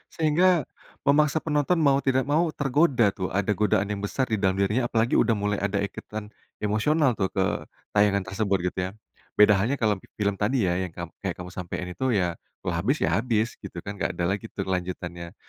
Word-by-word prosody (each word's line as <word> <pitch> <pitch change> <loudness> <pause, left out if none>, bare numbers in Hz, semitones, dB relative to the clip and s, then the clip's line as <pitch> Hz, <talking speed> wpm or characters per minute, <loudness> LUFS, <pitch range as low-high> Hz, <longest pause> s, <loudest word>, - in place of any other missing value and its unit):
Sehingga, 160 +3 +3 0.6
memaksa 150 +1 +4
penonton 150 +3 +2
mau 135 0 +4
tidak 130 0 +3
mau 160 +3 +4
tergoda 140 -2 +2
tuh, 95 -2 -1
ada 100 +1 +1
godaan 105 -2 +2
yang 100 -1 -3
besar 130 +6 0
di - - +3
dalam 95 -2 +2
dirinya 110 +6 +1
apalagi 115 +1 +1
udah 115 -1 +3
mulai 105 0 -1
ada 100 0 -1
ikatan, 105 +1 -6 0.3
emosional 135 +8 +2
tuh, 95 - +2
ke, 95 - +3 0.5
tayangan 100 -1 +3
tersebut 100 0 0
gitu - - -31
ya. - - -5 0.5
Beda 105 0 +7
halnya 120 +7 +1
kalau, 110 -2 +3 0.2
film 105 -1 +1
tadi 120 +3 +2
ya 90 - +2
yang 95 - -3
kam 85 0 -5
kayak 95 -3 -2
kamu 90 0 -8
sampein 90 0 -5
itu 130 - -3
ya, 90 -2 +1 0.3
kalau - - 0
habis 120 - +1
ya - - +2
habis 115 -2 +1
gitu 100 -3 -9
kan, 100 - -3
nggak - - -1
ada 85 - -1
lagi 105 +3 -3
tuh 95 - -4
kelanjutannya. 90 -2 -4
105 Hz, 200 wpm, -26 LUFS, 95-130 Hz, 0.6 s, Beda